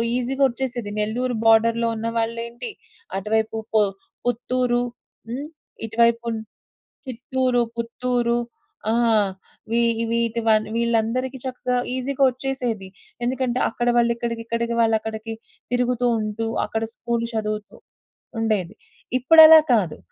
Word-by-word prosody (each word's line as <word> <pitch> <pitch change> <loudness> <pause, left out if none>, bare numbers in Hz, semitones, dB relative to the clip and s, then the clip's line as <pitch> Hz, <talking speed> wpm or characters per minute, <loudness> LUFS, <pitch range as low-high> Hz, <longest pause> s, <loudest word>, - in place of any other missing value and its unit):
ఈజీగొచ్చేసేది. 250 -3 -1
నెల్లూరు 240 +4 -1
బోర్డర్‌లో 230 +1 +4
ఉన్న 225 +1 -3
వాళ్ళేంటి. 235 - -3 0.5
అటువైపు 220 +2 0 0.2
పొ 215 - +5 0.5
పుత్తూరు, 245 +1 +1 0.5
హ్మ్. 270 +5 -4 0.4
ఇటువైపున్ 230 0 +1 0.7
చిత్తూరు, 255 0 0 0.2
పుత్తూరు. 235 0 0 0.5
ఆ! - - +2 0.8
వీ 230 - +2 0.3
వీటివ 230 0 0 0.3
వీళ్ళందరికీ 235 +3 0
చక్కగా 250 -1 -2 0.2
ఈజీగొచ్చేసేది. 260 -4 -1 0.4
ఎందుకంటే, 255 0 0
అక్కడ 240 +1 -3
వాళ్ళుక్కడికి, 235 -1 0
ఇక్కడికి 235 0 -2
వాళ్ళుక్కడికి 220 0 -1 0.4
తిరుగుతూ 245 0 +1
ఉంటూ, 215 +1 -3 0.2
అక్కడ 225 0 -3
స్కూల్ 235 -1 -2
చదువుతూ 215 -1 -3 0.6
ఉండేది. 215 -5 0 0.4
ఇప్పుడలా 320 +4 +9
కాదు. 195 -9 +1
235 Hz, 90 wpm, -23 LUFS, 225-250 Hz, 0.8 s, ఇప్పుడలా